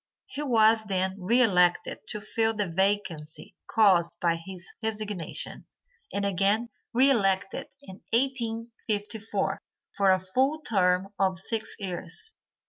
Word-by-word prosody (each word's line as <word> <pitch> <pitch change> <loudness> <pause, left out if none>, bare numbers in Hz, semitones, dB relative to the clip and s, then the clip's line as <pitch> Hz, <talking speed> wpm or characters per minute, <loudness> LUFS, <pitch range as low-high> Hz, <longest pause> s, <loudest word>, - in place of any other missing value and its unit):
He 290 - -6
was 225 -5 +4
then 190 -1 -1
re 235 +7 +4
elected 180 -5 +3
to 210 - -5
fill 225 +1 0
the 205 -2 0
vacancy 175 -4 -1
caused 185 -6 +4
by 170 -1 +2
his 175 +1 -8
resignation, 210 -5 -4 0.4
and 200 0 -1
again 200 +4 +2 0.2
re 265 +4 +5
elected 195 -6 +1 0.2
in 190 -6 -12
1854 225 -3 -2 0.3
for 200 -1 +3
a 185 - +6
full 260 +12 0
term 190 -5 +1
of 190 -1 +2
six 220 +4 -1
years. 185 - -5
205 Hz, 125 wpm, -27 LUFS, 185-225 Hz, 0.4 s, a